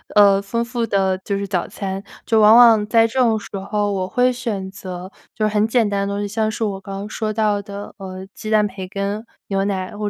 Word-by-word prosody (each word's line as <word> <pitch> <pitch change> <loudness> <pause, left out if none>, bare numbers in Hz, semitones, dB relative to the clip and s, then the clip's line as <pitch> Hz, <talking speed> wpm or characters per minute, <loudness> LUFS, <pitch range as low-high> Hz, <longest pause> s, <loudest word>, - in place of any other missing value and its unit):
呃， 200 -1 +6
丰 230 +4 -2
富 235 0 -2
的 195 -3 +1
就 200 +1 -3
是 200 - -3
早 185 -3 -1
餐， 195 0 -5 0.2
就 225 - +3
往 215 +1 +7
往 230 -3 +7
在 225 0 +4
这 245 +3 -3
种 230 -3 +3
时 - - -11
候 205 +1 -1
我 190 -2 -1
会 250 +6 +2
选 215 -6 -4
择 185 -1 -8 0.2
就 215 - 0
是 215 - -3
很 210 +1 +3
简 225 -2 +2
单 200 -1 -1
的 200 - -2
东 205 - -2
西。 205 - -2
像 215 +1 0
是 225 - -3
我 200 -3 -2
刚 195 0 -8
刚 205 +1 -6
说 215 -1 -3
到 210 -2 +1
的， 200 0 -8
呃， 190 -1 -8
鸡 215 - -6
蛋、 210 -1 +4
培 190 -2 -7
根、 200 +3 -3 0.2
牛 195 0 0
奶， 190 0 -3
或 210 - -3
205 Hz, 260 characters per minute, -20 LUFS, 195-220 Hz, 0.2 s, 往